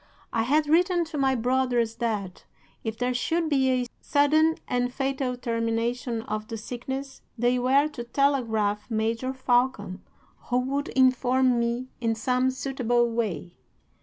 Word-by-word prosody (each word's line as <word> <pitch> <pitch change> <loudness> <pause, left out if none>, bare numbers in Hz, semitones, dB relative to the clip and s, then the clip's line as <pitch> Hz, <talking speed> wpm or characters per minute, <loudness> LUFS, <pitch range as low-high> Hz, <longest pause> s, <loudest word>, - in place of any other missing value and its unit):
I 230 - +2
had 295 +6 +2
written 345 +3 +3
to 320 -1 -6
my 265 -1 +2
brothers 245 -2 +1
that, 210 -6 -3 0.4
if 220 -1 -4
there 250 +1 0
should 325 +6 0
be 265 -3 +2
a 255 -1 +1 0.2
sudden 310 +3 +3
and 245 0 0
fatal 265 -1 -2
termination 230 0 -2
of 215 0 -4
the 225 - -5
sickness, 265 +4 -6 0.2
they 245 +2 +2
were 270 +4 +3
to 245 -5 -7
telegraph 230 -6 0
Major 225 +3 -1
Falcon, 245 -7 0 0.4
who 245 - 0
would 275 +3 -1
inform 255 -1 +3
me 235 +2 -1
in 225 -1 +1
some 250 +3 +1
suitable 245 -2 0
way. 195 -8 -2
250 Hz, 140 wpm, -26 LUFS, 230-265 Hz, 0.4 s, written